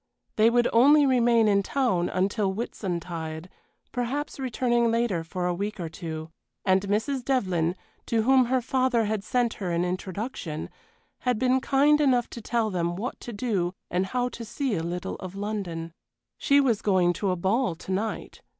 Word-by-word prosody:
They 220 +1 +5
would 240 0 +3
only 285 +5 +6
remain 240 -4 +4
in 200 -1 +4
town 200 -6 0
until 195 +2 0
Whitsuntide, 175 -5 -4 0.4
perhaps 265 +5 -3
returning 240 -2 +1
later 225 -7 0
for 180 +2 -4
a 180 - +1
week 205 +3 -4
or 170 -2 -3
two; 160 -1 -6 0.3
and 190 0 +4
Mrs. 220 +7 -1
Devlyn, 185 -10 0 0.3
to 225 -1 +1
whom 260 +1 +5
her 255 +1 0
father 255 -2 +2
had 210 -1 -2
sent 240 +1 +1
her 185 - -2
an 170 +1 0
introduction, 185 -2 -4 0.5
had 250 -3 0
been 255 +2 +2
kind 290 +3 +4
enough 250 -4 +2
to 235 - -7
tell 225 -1 0
them 175 -1 -1
what 230 +8 -4
to 240 - -7
do 200 -5 -1 0.2
and 185 +2 0
how 245 +3 0
to 235 - -8
see 260 +2 -2
a 170 - 0
little 175 +2 -4
of 185 0 -8
London. 195 -5 -4 0.5
She 280 0 +4
was 245 -7 +2
going 185 -3 +3
to 195 +2 -2
a 185 - +1
ball 190 +3 0
to 175 - -8
night. 210 +4 -3
215 Hz, 175 wpm, -26 LUFS, 180-245 Hz, 0.5 s, only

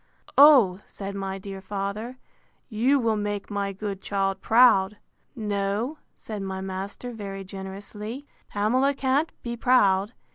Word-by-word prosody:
O! 260 -11 +7
said 200 0 -7
my 195 -1 -4
dear 195 0 -8
father, 200 +5 -4 0.5
you 245 +5 +3
will 225 -3 +1
make 205 -1 -3
my 200 -1 -1
good 195 0 -5
child 195 -1 -1
proud. 215 -4 +5 0.4
No, 210 +5 -2 0.2
said 215 -2 -7
my 190 -1 -4
master 190 +5 -5
very 200 -4 -6
generously, 200 +6 -7 0.2
Pamela 255 +7 +1
can't 275 +4 +1
be 235 -1 -3
proud. 210 -4 +3
205 Hz, 130 wpm, -25 LUFS, 195-235 Hz, 0.5 s, O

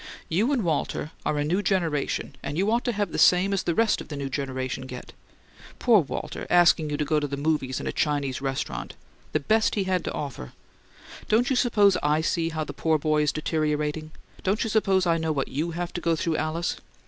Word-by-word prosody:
"You 210 - +2
and 255 -6 +1
Walter 155 -2 -1 0.2
are 150 - 0
a 145 - +1
new 175 +7 +1
generation 165 -8 -1
and 145 - -4
you 200 +4 +2
ought 235 +1 +1
to 245 - +1
have 205 -2 -2
the - - -3
same 185 +2 +5
as 195 - +1
the 170 - -1
rest 225 -1 +2
of - - -10
the 150 - -6
new 140 -1 -3
generation 130 -1 -3
get. 125 -1 -9 0.6
Poor 235 -4 +5
Walter 145 - -5
asking 170 -3 +5
you 145 - -2
to 150 - -1
go 155 0 +2
to 145 - -2
the 140 0 -4
movies 140 -3 0
and - - -5
a - - 0
Chinese 145 -3 -1
restaurant: 135 - -3 0.4
the - - +1
best 220 +9 +2
he 200 - +1
had 185 -2 0
to - - -2
offer! 135 - -6 0.8
Don't 240 +4 +3
you - - +3
suppose 205 -6 +4
I 150 +1 +2
see 165 0 0
how 160 -1 -2
the - - -7
poor 160 -1 +1
boy 155 0 +1
is 150 -1 +2
deteriorating? 155 0 -1 0.3
Don't 195 +3 0
you 225 - -2
suppose 195 -4 +2
I 165 -1 +2
know 160 0 -1
what 140 -3 -1
YOU 155 +5 -2
have 175 +1 -4
to 175 - -4
go 165 -1 +2
through, 165 0 -1
Alice? 160 +2 -2
160 Hz, 225 wpm, -26 LUFS, 145-190 Hz, 0.8 s, same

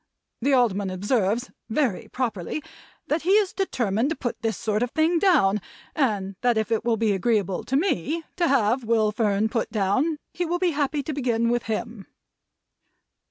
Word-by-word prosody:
The 275 +3 +2
Alderman 205 -6 +2
observes 205 +4 0 0.2
(very 230 -4 0
properly) 235 - -3 0.4
that 310 +2 0
he 370 +4 +2
is 410 -2 +3
determined 240 - 0
to 325 - -1
put 240 -6 -4
this 225 -3 -1
sort 215 0 -1
of 245 - 0
thing 320 +5 +2
down, 240 - +3 0.3
and 205 -9 0
that 245 -2 +2
if 220 +1 -1
it 225 - +1
will 230 -1 +1
be 220 -1 +2
agreeable 200 -2 0
to 265 - -1
me 315 - 0
to 345 -2 +2
have 250 -2 +2
Will 220 -2 +2
Fern 210 -1 +1
put 230 0 -2
down, 225 - +1 0.2
he 355 - -2
will 350 +1 -1
be 355 -1 +1
happy 290 -1 -1
to 305 - -4
begin 235 -4 +1
with 240 0 0
him." 225 -1 -4
235 Hz, 175 wpm, -25 LUFS, 210-290 Hz, 0.4 s, is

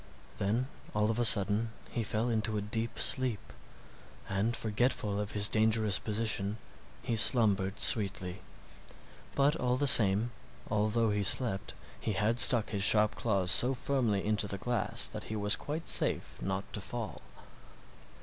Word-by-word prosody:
Then 110 +6 -1 0.3
all 105 +1 +1
of 115 - -4
a - - +1
sudden 110 +1 +4 0.2
he 120 - -3
fell 110 +2 -2
into 110 -2 -2
a - - -2
deep 110 +2 -5
sleep, 125 - +2 0.7
and 100 +5 -2
forgetful 105 -2 -2
of 105 -1 -5
his 105 -1 +2
dangerous 110 -2 +1
position 105 -1 -2 0.5
he 120 -1 -2
slumbered 105 -4 +1
sweetly. 95 -3 +1 0.9
But 140 +2 +2
all 125 0 -1
the 145 - -1
same, 110 -2 +5 0.4
although 110 +1 0
he 105 0 -1
slept, 100 0 +1 0.2
he 110 - -3
had 110 +4 -1
stuck 120 -4 +5
his 100 -2 -3
sharp 105 +1 +4
claws 95 -5 -1
so 130 +6 +3
firmly 120 -7 -2
into 105 -1 -1
the 100 - -3
glass 120 +1 -1
that - - -6
he 110 - -6
was 105 -1 +2
quite 155 +3 -7
safe - - +2
not 95 +2 -5
to 105 - -4
fall. 115 +1 -7
110 Hz, 150 wpm, -30 LUFS, 100-115 Hz, 0.9 s, same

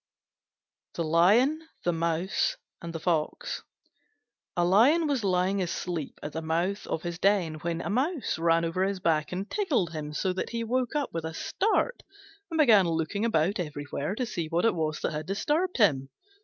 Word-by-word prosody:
THE 170 - -1
LION, 205 - +4 0.2
THE 175 - +1
MOUSE, 165 +2 0 0.2
AND 170 - -6
THE 165 - -5
FOX 165 - -1 1.0
A 175 - +3
Lion 250 - +5
was 280 -6 0
lying 190 +1 +1
asleep 175 -3 -4
at 150 - -4
the 160 - -3
mouth 170 +6 -1
of 160 - -3
his 175 0 -4
den 180 -6 +2
when 170 0 -2
a - - -4
Mouse 265 - 0
ran 165 0 +3
over 165 +3 0
his 195 0 -1
back 155 -3 +1
and 190 +3 -3
tickled 285 - 0
him 155 -2 -5
so 185 +4 0
that 185 - -3
he 230 0 -3
woke 250 +3 -1
up 290 -2 -1
with 165 -1 -3
a 160 0 -5
start 445 - 0 0.5
and 325 - -3
began 220 - +6
looking 165 +5 -1
about 195 -2 +1
everywhere 145 +1 -3
to 250 - -1
see 170 -8 -3
what 170 +4 0
it 230 - +4
was 155 -2 -2
that - - -1
had 155 +1 -5
disturbed 305 - 0
him. 140 - +3
180 Hz, 185 wpm, -28 LUFS, 165-225 Hz, 1.0 s, began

